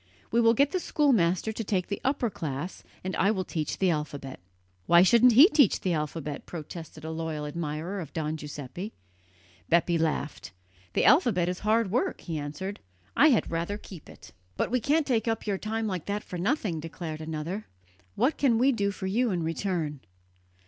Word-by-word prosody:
We 235 - +3
will 230 0 +5
get 280 +4 +3
the 370 - 0
schoolmaster 220 - +2
to 225 +1 -4
take 190 -3 0
the 200 - -4
upper 260 -4 0
class, 155 +1 -5 0.2
and 185 +1 -3
I 195 - +3
will 195 -3 0
teach 155 -4 -3
the 190 -2 +2
alphabet." 145 -4 -4 0.5
"Why 170 +1 +7
shouldn't 235 +5 +6
he 275 +9 +9
teach 285 - +4
the 185 - 0
alphabet?" 150 -2 -4
protested 160 -1 -8
a 160 - -4
loyal 160 -2 -3
admirer 160 +4 -4
of 160 -5 -7
Don 155 -1 -2
Giuseppe. 150 - -7 0.8
Bepi 170 0 +3
laughed. 155 -9 -2 0.4
"The - - +2
alphabet 210 - +4
is 180 0 -2
hard 215 -1 +1
work," 310 - 0
he 165 -3 -4
answered, 190 +8 -5 0.4
"I 300 - +7
had 240 - +2
rather 170 +5 -2
keep 185 -6 -12
it." - - -14 0.3
"But - - -1
we 250 - +2
can't 295 +6 +2
take 240 -4 0
up 225 0 -1
your 200 -3 -1
time 220 +1 -2
like 185 -6 -3
that 205 +1 -2
for 180 - -6
nothing," 200 - 0
declared 160 0 -6
another. 160 +6 -4 0.5
"What 285 - +1
can 250 -5 +3
we 260 +4 +4
do 205 -5 0
for 200 -1 -5
you 230 +6 +1
in 175 -4 -1
return?" 165 -3 -2
185 Hz, 185 wpm, -28 LUFS, 160-225 Hz, 0.8 s, he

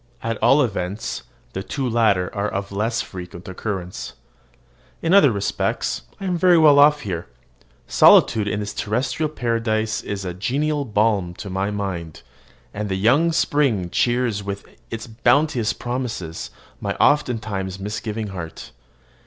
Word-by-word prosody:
At 115 -1 -3
all 135 +6 +5
events, 100 -1 -3 0.3
the 95 - -3
two 130 +7 -3
latter 110 -6 +2
are 100 +1 0
of 100 0 -4
less 110 +4 -1
frequent 90 -1 -9
occurrence. 95 -1 -5 0.9
In 165 +2 +2
other 175 -10 +7
respects 100 -2 -1 0.2
I 195 - -5
am 180 -2 -1
very 180 -1 +6
well 150 -3 +7
off 150 +1 +6
here. 85 -7 -4 0.6
Solitude 105 -2 +5
in 105 - -1
this 105 - -4
terrestrial 125 +8 -1
paradise 115 -5 -1
is 100 -2 -5
a 90 - -3
genial 140 - -1
balm 105 -5 +1
to 100 0 -7
my 95 +2 -1
mind, 95 -6 -4 0.5
and 105 0 -4
the 95 - 0
young 130 - +3
spring 135 - +1
cheers 120 -4 +1
with 100 0 -5 0.2
its 115 0 -5
bounteous 120 +1 +2
promises 120 -10 -4 0.3
my - - -3
oftentimes 110 -9 +1
misgiving 105 +2 -4
heart. 85 -8 -8
110 Hz, 140 wpm, -22 LUFS, 95-125 Hz, 0.9 s, other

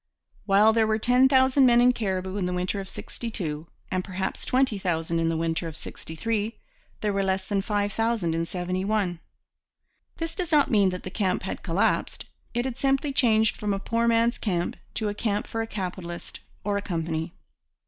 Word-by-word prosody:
While 210 +2 +6
there 225 -1 +3
were 215 0 +2
ten 250 +4 +4
thousand 260 0 +5
men 240 -1 +6
in 245 +1 +6
Cariboo 190 -4 -2
in 185 -3 0
the 180 - -2
winter 180 +3 -1
of 190 -1 -6
'62 170 -10 -5 0.2
and 185 0 0
perhaps 190 0 -3
twenty 255 -5 +2
thousand 165 -2 -1
in 165 0 +1
the 165 - 0
winter 165 +1 -1
of 160 -1 -7
'63, 215 +6 -4 0.4
there 210 -1 0
were 195 - +1
less 190 0 0
than 200 -2 +1
five 205 0 -1
thousand 225 -7 0
in 165 0 -1
'71. 185 +1 -1 1.0
This 330 0 -3
does 355 -3 -3
not 295 -2 +4
mean 200 -4 +5
that 180 0 -5
the 185 - -6
camp 185 -3 0
had 190 - -4
collapsed. 180 +2 0 0.3
It 240 +1 +1
had 260 -1 -4
simply 275 +1 +1
changed 220 -4 +3
from 205 -1 -1
a - - -3
poor 230 +3 0
man's 230 +1 +3
camp 175 -5 -1 0.2
to 215 - -1
a 205 - -1
camp 210 -1 -1
for 225 - -3
a 225 - -3
capitalist 180 -4 -5 0.2
or 205 0 0
a - - -1
company. 165 -3 -3
200 Hz, 190 wpm, -26 LUFS, 180-230 Hz, 1.0 s, While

